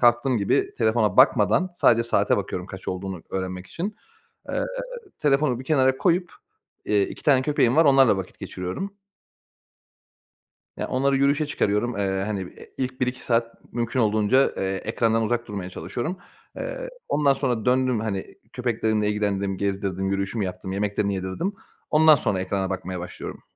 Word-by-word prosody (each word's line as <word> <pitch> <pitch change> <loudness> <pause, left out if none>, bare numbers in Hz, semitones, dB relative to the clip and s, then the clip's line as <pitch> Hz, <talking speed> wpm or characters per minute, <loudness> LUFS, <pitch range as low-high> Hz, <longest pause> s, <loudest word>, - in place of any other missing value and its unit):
kalktığım 120 +1 +4
gibi 100 - +1
telefona 110 -1 +2
bakmadan 175 +6 +4
sadece 115 -6 +4
saate 115 - +2
bakıyorum 90 0 -3
kaç 95 0 -8
olduğunu 95 -2 -4
öğrenmek 95 -1 -4
için. 200 - -4 0.5
Eee, - - -1 0.6
telefonu 140 -3 +2
bir - - -7
kenara 130 -3 +3
koyup, 175 +1 +1 0.5
iii, 105 -1 +3
2 - - -7
tane 135 -3 +5
köpeğim 130 -4 +2
var 165 +1 +6
onlarla 135 -7 +6
vakit 95 - -7
geçiriyorum. 90 - -5 1.8
Ya, - - -3
onları 135 +1 +2
yürüyüşe 140 +3 +2
çıkarıyorum. 115 -3 0
Eee, 95 -1 0
hani, 105 -2 -2
e 90 - -11
ilk 130 0 -3
1-2 125 0 -1
saat 115 -1 -1
mümkün 120 +2 -1
olduğunca, 110 +4 +3
eee, 95 0 -1
ekrandan 115 0 +1
uzak 120 +1 -1
durmaya 100 -3 -5
çalışıyorum. 155 - -4 0.4
Eee, - - -5 0.2
ondan 145 -2 +3
sonra 125 -5 -1
döndüm, 125 -2 +2
hani, 100 -3 -2 0.3
köpeklerimle 110 -4 0
ilgilendim, 100 -2 -1
gezdirdim, 95 -1 -1
yürüyüşümü 100 +2 -1
yaptım, 95 0 -5
yemeklerini 100 0 0
yedirdim. 95 - -2 0.4
Ondan 155 0 +7
sonra 105 -8 -1
ekrana 95 0 -2
bakmaya 95 -1 -4
başlıyorum. 90 - -7
115 Hz, 150 wpm, -24 LUFS, 100-130 Hz, 1.8 s, Ondan